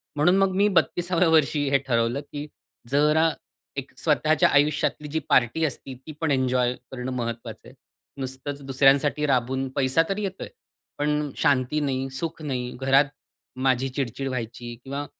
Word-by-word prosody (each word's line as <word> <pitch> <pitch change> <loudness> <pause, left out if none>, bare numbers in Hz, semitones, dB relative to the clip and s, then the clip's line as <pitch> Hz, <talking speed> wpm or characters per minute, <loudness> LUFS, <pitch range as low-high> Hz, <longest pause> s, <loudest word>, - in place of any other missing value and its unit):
म्हणून 175 +6 +4
मग 195 -1 +3
मी 200 +2 +4
32व्या 175 +1 0
वर्षी 150 -2 +3
हे 140 - +4
ठरवलं 120 +3 +1
की 145 +1 -5 0.4
जरा 150 +3 +4 0.5
एक - - -5
स्वतःच्या 155 -1 +3
आयुष्यातली 150 +1 +1
जी 160 +2 -1
पार्टी 130 +7 +3
असती, 135 -2 -5
ती 135 +5 -11
पण 160 -3 +1
एन्जॉय 125 -2 +2 0.2
करणं 130 0 -4
महत्वाचं 115 -2 -5
आहे. - - -14 0.5
नुसतंच 130 +2 -5
दुसऱ्यांसाठी 140 +2 +3
राबून, 130 0 0
पैसा 130 +3 +3
तर 195 - -1
येतोय, 195 -2 -4 0.5
पण 150 -1 0
शांती 140 -1 +2
नाही, 135 -2 -1
सुख 160 +4 -5
नाही. 125 -4 -3
घरात 135 +1 +5 0.5
माझी 130 0 +1
चिड-चिड 135 0 -3
व्हायची 120 -1 -5
किंवा 140 +2 -4
140 Hz, 145 wpm, -25 LUFS, 130-150 Hz, 0.5 s, घरात